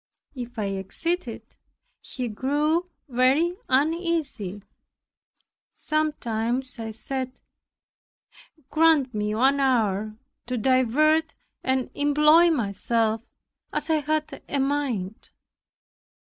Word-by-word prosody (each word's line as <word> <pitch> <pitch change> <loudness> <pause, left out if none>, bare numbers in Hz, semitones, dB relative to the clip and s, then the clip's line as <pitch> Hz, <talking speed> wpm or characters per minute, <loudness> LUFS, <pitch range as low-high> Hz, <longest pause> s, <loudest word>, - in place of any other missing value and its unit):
If 245 -2 -8
I 215 - -1
exceeded, 225 - -3 0.6
he 250 -2 -5
grew 295 +9 0 0.2
very 270 +7 +2
uneasy. 285 - 0 1.1
Sometimes 255 -5 -1
I 225 -1 -4
said, 255 +3 -5 1.3
"Grant 310 -4 +4
me 210 0 -1
one 270 +5 +3
hour 215 -6 +1 0.3
to 250 0 -2
divert 265 +7 +2 0.3
and 260 -1 0
employ 300 +4 +5
myself 225 - 0 0.5
as 300 +2 -1
I 315 - +4
have 305 +1 0 0.2
a 280 - 0
mind." 265 -8 -2
260 Hz, 90 wpm, -25 LUFS, 225-305 Hz, 1.3 s, employ